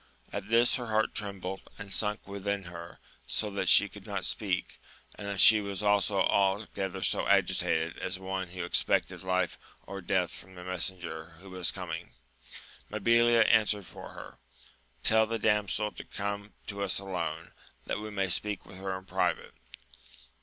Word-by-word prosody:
At 100 - -4
this 115 +1 +4
her 120 -2 -5
heart 110 0 +1
trembled, 95 -2 -4 0.2
and 100 -2 -6
sunk 105 -1 0
within 100 0 -2
her, 85 -1 -9 0.3
so 105 -1 -1
that 100 - 0
she - - +8
could - - -13
not - - -2
speak, - - -2 0.3
and 100 -2 -4
she 110 -1 +8
was 100 0 -4
altogether 100 -1 +1
so - - +2
agitated 80 +1 +2
as 95 +1 -2
one 95 0 -3
who 90 +1 -6
expected 85 - +1
life 95 0 0 0.3
or 100 0 -6
death 90 -1 +1
from 95 +1 -11
the 90 - -9
messenger 90 -3 -3
who 95 0 -12
was 90 -2 +2
coming. - - -6 0.8
Mabilia 115 +2 +5
answered 105 -3 +3
for - - -10
her: - - -11 0.6
Tell 110 0 +4
the 115 +1 -1
damsel 105 0 +1
to - - -9
come 100 +1 -5
to 100 -1 -5
us 100 -2 +1
alone, 85 -4 -4 0.3
that - - -2
we 110 0 -6
may 100 -2 -1
speak 105 +3 0
with 95 - -12
her 95 0 -3
in 95 - -12
private. - - -1
100 Hz, 160 wpm, -30 LUFS, 95-105 Hz, 0.8 s, she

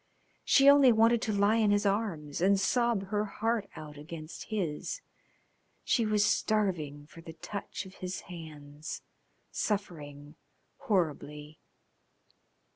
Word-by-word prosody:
She 275 0 +5
only 280 -2 +8
wanted 225 +1 +4
to 225 - -1
lie 205 +2 +3
in 220 -2 +3
his 205 0 +2
arms 190 -8 -1
and 195 +2 +4
sob 230 -2 +1
her 210 0 +1
heart 225 0 -1
out 150 -1 -9
against 155 +1 -8
his. 195 - -3 0.8
She 230 -5 +2
was 210 -1 +3
starving 170 -12 0
for 165 +2 -14
the 165 -1 -10
touch 200 +4 -6
of 190 - -12
his 185 0 -4
hands, 155 -3 -9 0.5
suffering 150 -7 -4 0.4
horribly. 150 -5 -2
195 Hz, 120 wpm, -30 LUFS, 155-215 Hz, 0.8 s, only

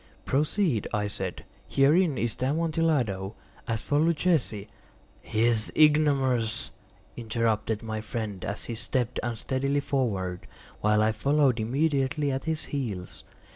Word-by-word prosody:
"Proceed," 150 - +1
I 105 -1 0
said; 95 -3 -5 0.2
"herein 150 +2 +3
is 120 -2 -1
the 130 - -1
Amontillado. 145 - 0 0.3
As 115 -3 -1
for 145 - +1
Luchesi—" 155 - +1 0.5
"He 110 +1 -1
is 115 -2 +2
an - - -3
ignoramus," 135 -7 +3 0.4
interrupted 115 -1 -1
my 110 -1 -3
friend, 105 -3 -5
as 105 - -4
he 120 - -4
stepped 125 +2 -2
unsteadily 130 +4 -1
forward, 100 -11 -2 0.3
while 105 0 +3
I 110 - +3
followed 140 +1 +2
immediately 140 +3 +1
at 135 +2 -3
his 160 -1 -2
heels. 105 -11 -4
125 Hz, 130 wpm, -27 LUFS, 110-145 Hz, 0.5 s, herein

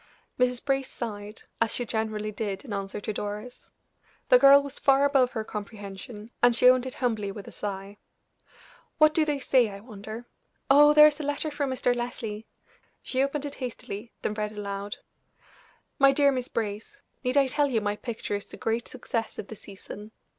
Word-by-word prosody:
Mrs. 250 -1 +1
Brace 270 -1 0
sighed, 210 -2 -6 0.2
as 230 - +2
she 245 - -1
generally 215 -1 -2
did 205 +1 -4
in 225 - -6
answer 195 0 -4
to 210 +1 -4
Doris. 210 +4 -6 0.6
The - - +8
girl 280 - +8
was 280 0 -7
far 275 0 +4
above 270 -3 +3
her 220 - -2
comprehension, 210 +1 -8
and 245 -1 +5
she 250 +2 +5
owned 255 0 +5
it 255 - -4
humbly 220 -5 -1
with 200 0 -9
a - - -9
sigh. 200 0 -6 1.0
"What 310 0 +6
do 315 0 +3
they 295 -2 0
say, 255 -4 +3
I 200 0 -8
wonder? 220 +1 -9 0.5
Oh, 295 +2 +7
there 300 0 +10
is 300 0 +3
a - - -3
letter 290 +2 -2
from 290 -1 -2
Mr. 250 -1 +1
Leslie!" 230 -3 -5 0.6
She 260 - 0
opened 275 +1 -1
it 285 - -5
hastily, 230 -3 -6
then - - -1
read 210 0 -3
aloud: 200 -1 -5 1.0
"MY 275 0 +6
DEAR 280 0 +4
MISS 255 -2 -2
BRACE, 210 -1 -5 0.2
Need 250 +2 0
I 280 - +6
tell 285 +2 +1
you 245 -5 +1
my 205 -1 -1
picture 225 -1 -5
is 205 0 -3
the - - -11
great 230 -1 -1
success 230 -3 -4
of 200 - -7
the 220 - -7
season? 205 +2 -11
235 Hz, 190 wpm, -27 LUFS, 210-270 Hz, 1.0 s, there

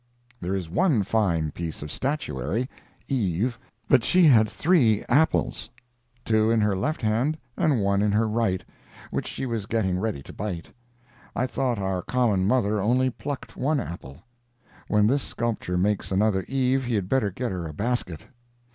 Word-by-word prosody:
There 90 +2 -2
is 95 -4 -3
one 145 - +2
fine 90 -7 +1
piece 80 -2 -5
of 75 - -7
statuary—Eve—but 115 - -2
she 180 -1 +4
had 110 -7 +6
three 125 - +3
apples—two 120 -6 0
in 115 0 +3
her 105 -2 +2
left 135 +10 -2
hand, 120 +8 +1 0.2
and 140 -8 +2
one 100 0 +2
in 105 0 +2
her 110 +2 +2
right, 105 -5 0 0.5
which - - -2
she - - -4
was 115 -5 -3
getting 95 -5 0
ready 100 -10 -2
to - - -11
bite. 95 -5 -5 0.6
I 125 - +1
thought 130 -2 -1
our 95 -2 -1
common 105 -5 +1
mother 105 -3 +2
only 130 +5 +2
plucked 140 +2 -6
one 145 +2 +1
apple. 80 - -8 0.6
When 105 0 +3
this 135 +6 +2
sculptor 115 -8 -2
makes 100 +2 0
another 95 -1 +2
Eve 130 0 +1
he 120 -2 0
had 100 -3 -1
better 120 -2 +1
get 120 +5 -3
her 90 -3 -4
a 75 - -7
basket. 105 -5 -2
110 Hz, 155 wpm, -25 LUFS, 95-125 Hz, 0.6 s, had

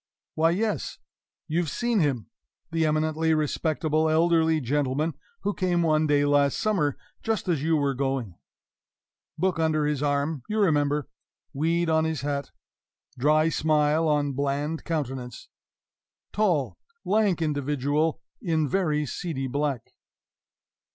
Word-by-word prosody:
Why, 160 +1 +3
yes! 210 +5 -1 0.5
You've 165 0 0
seen 240 +3 0
him 135 - 0 0.5
the 165 -1 +1
eminently 155 +1 +1
respectable 155 +1 0
elderly 160 0 +3
gentleman 145 +3 0 0.3
who 205 - -1
came 175 -3 +1
one 155 -1 +2
day 145 -1 +3
last 145 -1 +3
summer 175 -10 0 0.2
just 220 -5 -2
as 165 -6 +1
you 160 +1 +2
were 140 -2 +1
going; 135 -6 -2 1.0
book 185 -3 0
under 155 -2 +1
his 150 -2 -1
arm, 145 0 0
you 215 - -1
remember; 150 -7 +2 0.5
weed 165 +4 +1
on 160 0 +2
his 160 -4 -2
hat; 140 -1 -3 0.7
dry 155 +4 +3
smile 155 0 +2
on 145 -2 +1
bland 145 +3 -2
countenance; 130 -7 -4 0.8
tall, 175 -11 0 0.3
lank 205 -4 +2
individual 150 +1 0 0.2
in 160 -7 0
very 155 -4 0
seedy 140 -1 -4
black. 140 -1 -2
155 Hz, 125 wpm, -26 LUFS, 145-165 Hz, 1.0 s, Why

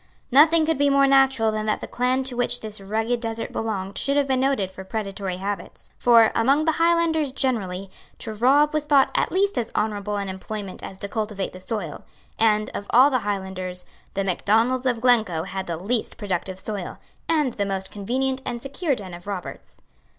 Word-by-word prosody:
Nothing 310 +4 +6
could 320 -3 0
be 285 0 +4
more 275 0 +5
natural 270 -4 +4
than 215 0 -3
that 215 - +1
the - - -6
clan 255 +2 0
to 260 -1 -3
which 245 0 0
this 215 -2 -5
rugged 220 +4 -1
desert 225 -1 -4
belonged 200 -3 -3
should 280 +1 0
have 285 -1 +2
been 260 -1 +1
noted 260 -8 +1
for 190 0 -9
predatory 195 -2 -4
habits. 200 +2 -6
For, 230 -2 +6
among 275 +7 +3
the 320 - +4
Highlanders 330 -4 +2
generally, 195 -8 -1 0.3
to 220 - -5
rob 280 +7 +4
was 305 -1 0
thought 285 -2 +4
at - - +1
least 400 +2 +1
as 230 - -4
honourable 210 -1 -1
an 200 -1 -2
employment 190 +1 -6
as 190 - -8
to 200 - -3
cultivate 210 -2 -3
the 185 - -10
soil; 185 -7 -4 0.4
and, 215 -1 +2
of 200 - -5
all 260 +4 +6
the 255 - +2
Highlanders, 190 -3 -4 0.3
The 195 - 0
Macdonalds 225 +7 +1
of 240 -3 0
Glencoe 220 -10 +3
had 190 +1 -5
the 170 -1 -3
least 215 +7 -2
productive 190 -2 -3
soil, 200 -3 -5 0.3
and 300 -6 +2
the 200 - -1
most 190 -1 -3
convenient 260 +6 -1
and 240 - -4
secure 275 +4 -2
den 190 -5 -8
of 175 +2 -10
robbers. 195 -3 -7
225 Hz, 195 wpm, -24 LUFS, 195-265 Hz, 0.4 s, Nothing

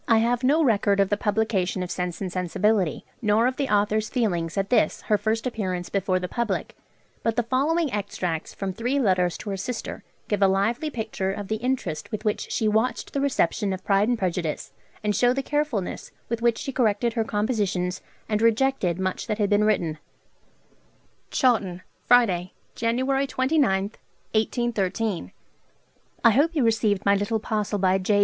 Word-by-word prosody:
I 225 - +5
have 235 +2 +1
no 300 +5 +4
record 205 -5 +2
of 195 -1 +3
the 205 - +2
publication 200 -4 0
of 180 - -5
'Sense 180 0 -3
and 185 -2 -3
Sensibility,' 185 0 0 0.2
nor 215 +1 +3
of 255 +1 0
the 280 -2 -1
author's 210 +1 +1
feelings 175 -10 -1
at 195 +2 -1
this 245 - +2
her 210 - +2
first 220 +3 -1
appearance 185 -7 -3
before 195 -1 0
the 180 0 -3
public; 230 -2 -2 0.5
but 230 -1 0
the 240 - +1
following 285 +5 +1
extracts 180 -5 -3
from 195 -1 -4
three 245 +7 -1
letters 185 -7 +2
to 205 - -6
her 195 - -2
sister 230 +5 -5 0.2
give 205 -1 -1
a 195 - +6
lively 225 +10 +1
picture 220 -6 -3
of 200 0 -6
the 220 - 0
interest 215 -11 -3
with 215 +1 -4
which 210 0 -1
she 220 - +1
watched 220 +2 0
the 280 - 0
reception 210 -7 +1
of 185 0 -6
'Pride 200 +1 +3
and 245 - +2
Prejudice,' 175 -5 -2 0.3
and 210 -1 +1
show 245 +4 +4
the 270 +1 -2
carefulness 290 -10 -2 0.2
with 230 0 -2
which 235 -1 +2
she 275 - -4
corrected 230 -2 +1
her 225 -1 +1
compositions, 205 -5 -1 0.3
and 210 -1 0
rejected 230 -6 +2
much 185 0 -2
that 215 - -1
had 210 -1 0
been 205 +1 +4
written: 170 -7 0 1.3
Chawton, 200 -8 +1 0.2
Friday, 190 -8 +4 0.2
January 260 +4 0
29 260 -8 +1 0.4
(1813). 220 - -1 0.9
'I 230 - +7
hope 305 +8 +2
you 290 - +2
received 215 -3 +1
my 200 - +5
little 205 +3 0
parcel 210 -1 -1
by 190 0 +2
J. 205 +2 +2
210 Hz, 175 wpm, -25 LUFS, 190-240 Hz, 1.3 s, I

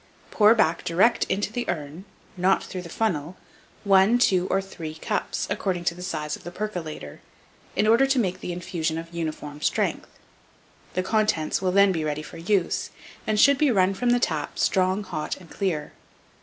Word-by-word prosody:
Pour 215 +1 +6
back 170 -7 +2
direct 195 +8 +3
into 205 +2 -2
the 245 0 -3
urn, 155 +5 -4 0.3
not 185 +1 +2
through 185 - -6
the 170 - -10
funnel, 175 -5 -2 0.5
one, 195 +3 +5
two, 185 -6 +3
or 195 - +1
three 165 -5 -7
cups, 160 - -2
according 190 -3 -2
to 175 - +1
the 180 - -11
size 155 -5 -3
of - - -15
the 175 - -6
percolater, 175 - -6 0.6
in - - +2
order 230 +5 +5
to 270 0 +1
make 190 -7 0
the - - -5
infusion 170 -2 -3
of 165 +1 -7
uniform 155 -3 -5
strength; - - 0 0.9
the 185 - +1
contents 210 -6 +1
will 185 -1 +1
then 200 +1 +5
be 165 -4 -1
ready 150 0 -2
for 165 - -10
use, 185 +1 0 0.4
and 215 -1 +1
should 280 +4 +5
run 195 -10 +3
from 240 +5 -1
the 245 0 +4
tap 155 -10 -2
strong, 190 +2 +1
hot, 155 -6 -4
and 180 -3 -16
clear. 165 -7 -2
185 Hz, 180 wpm, -25 LUFS, 165-210 Hz, 0.9 s, Pour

